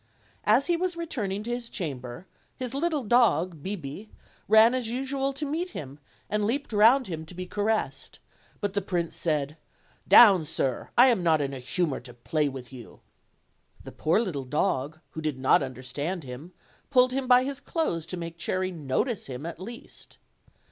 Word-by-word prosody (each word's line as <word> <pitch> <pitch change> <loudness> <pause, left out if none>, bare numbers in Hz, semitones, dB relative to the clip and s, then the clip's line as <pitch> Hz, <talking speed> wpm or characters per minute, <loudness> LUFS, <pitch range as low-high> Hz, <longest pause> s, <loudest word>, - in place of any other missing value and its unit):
As 225 +6 +4
he 345 - +2
was 355 0 -2
returning 210 - -3
to 235 - -4
his 240 -1 -5
chamber, 130 - -5 0.3
his 255 -1 -4
little 300 0 0
dog 205 - +2
Bibi 190 +2 -6 0.4
ran 220 +3 +7
as 250 -3 -1
usual 270 +2 -1
to 285 +3 -4
meet 325 +6 -2
him, 140 0 -8 0.3
and 210 0 -1
leaped 240 +4 -1
round 230 +6 +5
him 160 -5 -5
to 180 - -11
be 185 +1 -5
ca 205 +3 -5
ressed; 220 +1 -1 0.4
but 205 -1 -2
the 200 - 0
prince 175 -3 -2
said, 150 -2 -1 0.5
"Down, 200 -8 +8
sir; 135 -4 -2
I 250 +2 +8
am 230 -7 +2
not 160 -3 +3
in 140 -1 -2
a 135 - -6
humor 145 +3 -1
to 125 -2 -12
play 150 +5 -1
with 130 -1 -9
yon." 120 -3 -12 0.8
The - - -9
poor 165 +6 +1
little 175 - -2
dog, 150 +1 -1
who 160 - -6
did 155 -4 -2
not 130 +2 +4
understand 140 +6 -4
him, 135 +7 -9 0.4
pulled 255 -2 +5
him 265 -1 -2
by 250 0 +6
his 275 +1 -4
clothes 175 - -2
to 180 - -5
make 170 0 -7
Cherry 185 +2 -1
notice 170 - -2
him 130 +2 -6
at 165 -1 -6
least. 235 +6 -10
185 Hz, 180 wpm, -27 LUFS, 150-245 Hz, 0.8 s, Down